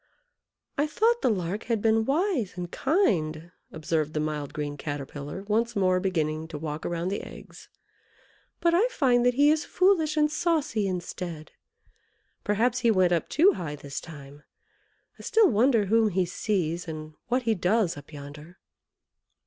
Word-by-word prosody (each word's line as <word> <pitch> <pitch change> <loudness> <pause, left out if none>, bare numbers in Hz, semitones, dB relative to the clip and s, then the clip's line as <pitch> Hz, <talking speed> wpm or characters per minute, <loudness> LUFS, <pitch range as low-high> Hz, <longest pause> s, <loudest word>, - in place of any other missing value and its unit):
"I 295 - +2
thought 465 +9 +2
the - - +2
Lark 195 0 -2
had 230 -2 0
been 220 +1 +2
wise 280 - 0
and 175 -1 -5
kind," 170 - 0 0.2
observed 155 -1 -2
the - - +1
mild 150 -2 -3
green 145 -1 -4
Caterpillar, 145 +4 -6
once 225 +3 0
more 185 -2 +2
beginning 160 -4 -1
to 160 -2 -7
walk 150 0 -5
around 175 +1 -2
the 200 - -3
eggs, - - -12 0.9
"but 340 -1 +2
I 395 +8 +4
find 255 - +2
that 245 - +2
he 290 +2 +5
is 310 0 +1
foolish 350 -5 +2
and 300 0 +3
saucy 310 - 0
instead. 175 -3 -5 0.9
Perhaps 230 +4 +1
he 235 - +2
went 185 -4 +3
up 170 - -1
too 375 +6 +5
high 155 - -5
this 140 -1 -7
time. 145 -3 -12 0.8
I - - -9
still 445 - +4
wonder 230 0 +3
whom 220 +2 +3
he 185 -1 +1
sees, 175 -2 -2
and 155 -1 -7
what 250 +1 0
he 225 -1 +2
does 190 0 +1
up 145 +1 -12
yonder." 150 +4 -11
190 Hz, 160 wpm, -27 LUFS, 155-250 Hz, 0.9 s, he